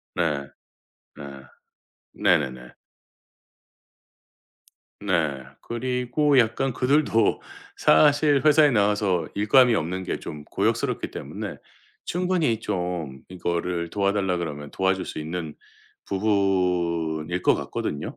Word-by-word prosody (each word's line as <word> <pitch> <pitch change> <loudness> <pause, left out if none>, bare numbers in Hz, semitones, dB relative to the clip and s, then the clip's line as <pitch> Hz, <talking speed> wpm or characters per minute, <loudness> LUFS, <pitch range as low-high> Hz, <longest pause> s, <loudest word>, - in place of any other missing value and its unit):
네. 80 -5 0 0.8
네. 75 - -9 0.9
네네네. 65 -3 0 2.3
네. 80 -9 -1 0.2
그리고 125 +4 0
약간 125 +3 +1
그들도 130 -1 +2 0.3
사실 145 -1 +4
회사에 150 -1 +6
나와서 100 -6 +1
일감이 120 +4 +4
없는게 90 +1 -3
좀 75 -1 -8
고역스럽기 - - -1
때문에 - - -6 0.5
충분히 175 -10 0
좀 90 -8 -4
이거를 85 -1 -3
도와달라 100 -2 0
그러면 75 -4 -5
도와줄 95 0 0
수 - - -7
있는 80 0 -5 0.5
부분일 90 -5 0
것 - - +4
같거든요. 75 - -4
95 Hz, 215 characters per minute, -24 LUFS, 85-120 Hz, 2.3 s, 회사에